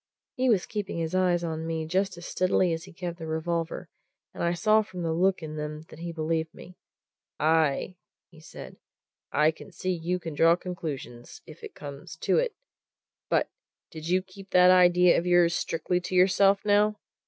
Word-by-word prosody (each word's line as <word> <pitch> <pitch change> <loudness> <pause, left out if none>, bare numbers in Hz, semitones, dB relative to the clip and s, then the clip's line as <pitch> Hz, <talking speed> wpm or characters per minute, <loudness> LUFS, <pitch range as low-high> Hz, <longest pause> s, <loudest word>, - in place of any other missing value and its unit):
He 255 0 +1
was 205 -6 +3
keeping 205 -4 -4
his 165 0 -3
eyes 180 -2 +2
on 160 -1 -4
me 160 -1 -2
just 185 +2 -1
as 175 - -9
steadily 185 -1 +1
as 165 +1 -5
he 190 - -13
kept 175 -1 -6
the 160 - -6
revolver, 165 +1 -3 0.5
and - - -5
I 170 0 +1
saw 215 +5 +4
from 185 -4 -7
the 165 -1 0
look 185 +1 +1
in 155 0 -6
them 150 0 -5
that 155 - -13
he 170 0 -5
believed 160 0 -2
me. 180 - -13 0.6
"Aye!" 160 +2 +1 0.3
he 165 - -16
said. 155 - -11 0.5
"I 150 +2 +3 0.2
see 185 - -3
you 175 +1 -1
can 165 -3 -7
draw 165 +3 +5
conclusions, 155 -9 -7
if 155 0 -14
it - - -9
comes 140 -1 -9
to - - +2
it. - - -1 0.7
But - - +1 0.4
did 160 0 -8
you 185 +2 +2
keep 190 +1 -14
that 180 0 +6
idea 180 -1 +5
of 175 - -4
yours 175 -1 +4
strictly 180 +2 -1
to 180 +1 -5
yourself, 195 +2 +4
now?" 210 +1 +3
175 Hz, 185 wpm, -27 LUFS, 160-185 Hz, 0.7 s, that